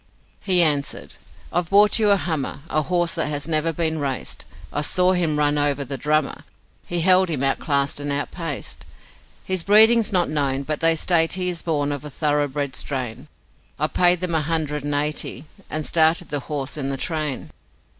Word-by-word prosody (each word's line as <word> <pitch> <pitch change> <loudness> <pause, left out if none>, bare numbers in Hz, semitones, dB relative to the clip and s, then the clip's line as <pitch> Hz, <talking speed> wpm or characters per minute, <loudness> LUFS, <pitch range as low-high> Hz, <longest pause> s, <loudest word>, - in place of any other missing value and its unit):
He 185 -3 +3
answered: 145 -3 0 0.4
'I've 175 -1 -1
bought 205 +2 +5
you 215 -2 +3
a 200 - +5
hummer, 155 -6 -3
A 155 - +1
horse 175 +1 0
that - - -1
has 145 0 -3
never 160 0 +1
been 160 -1 -2
raced; 135 -3 -5 0.3
I 145 - 0
saw 180 +4 +3
him 170 -5 +1
run 145 0 +2
over 145 -1 0
the 135 - -5
Drummer, 150 +2 -1 0.4
He 175 -1 -1
held 185 +1 +4
him 145 -5 -2
outclassed 140 +1 0
and 145 0 -3
outpaced. 145 +1 -5 0.6
His 185 -2 -1
breeding's 220 +4 +5
not 180 -3 +2
known, 140 -3 -1
but 150 +1 -3
they 165 0 +3
state 165 0 +3
he 180 0 0
Is 175 -2 -3
born 145 -3 -1
of 145 -2 -4
a 150 - -7
thoroughbred 145 -2 -1
strain, 130 0 -4 0.5
I 150 - 0
paid 175 +2 +2
them 180 -2 -1
a 160 - +2
hundred 150 -2 -2
and 145 0 -1
eighty, 150 +1 -1 0.2
And 155 -1 -2
started 165 +1 +2
the 145 - -2
horse 145 0 -5
in 135 -2 -2
the 135 - -2
train.' 155 -3 -2
155 Hz, 185 wpm, -22 LUFS, 145-175 Hz, 0.6 s, bought